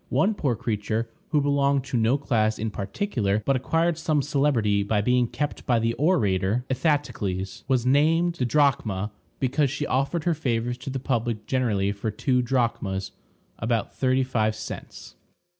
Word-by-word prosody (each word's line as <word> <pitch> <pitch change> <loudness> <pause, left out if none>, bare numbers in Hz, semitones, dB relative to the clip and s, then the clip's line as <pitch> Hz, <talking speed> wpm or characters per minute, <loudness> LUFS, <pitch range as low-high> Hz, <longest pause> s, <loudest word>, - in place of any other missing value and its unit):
One 205 +3 +2
poor 140 - 0
creature, 110 +1 -2 0.2
who 150 -2 +2
belonged 140 -1 +2
to 135 -1 -5
no 115 +3 +3
class 110 -6 +1
in 110 0 -3
particular, 105 - -1
but 135 - +2
acquired 165 +5 +1
some 155 -3 +1
celebrity 130 -8 +2
by 105 +1 0
being 125 +2 +2
kept 145 +5 -3
by 120 - +3
the 115 +1 +1
orator 115 - +1
Ithatocles, 120 - -1
was 130 -3 +1
named 160 +6 +3
Didrachma 120 -7 +1 0.3
because 135 +2 +1
she 145 +2 -3
offered 140 +6 0
her 175 - +2
favors 120 -4 -1
to 125 - -6
the 135 - -3
public 120 -4 -2
generally 105 -7 +1
for 100 +2 -3
two 125 +4 +1
drachmas, 110 -7 -1 0.5
about 115 -1 -1
thirty 130 0 +2
five 110 -4 0
cents. 110 0 -8
125 Hz, 155 wpm, -25 LUFS, 110-140 Hz, 0.5 s, no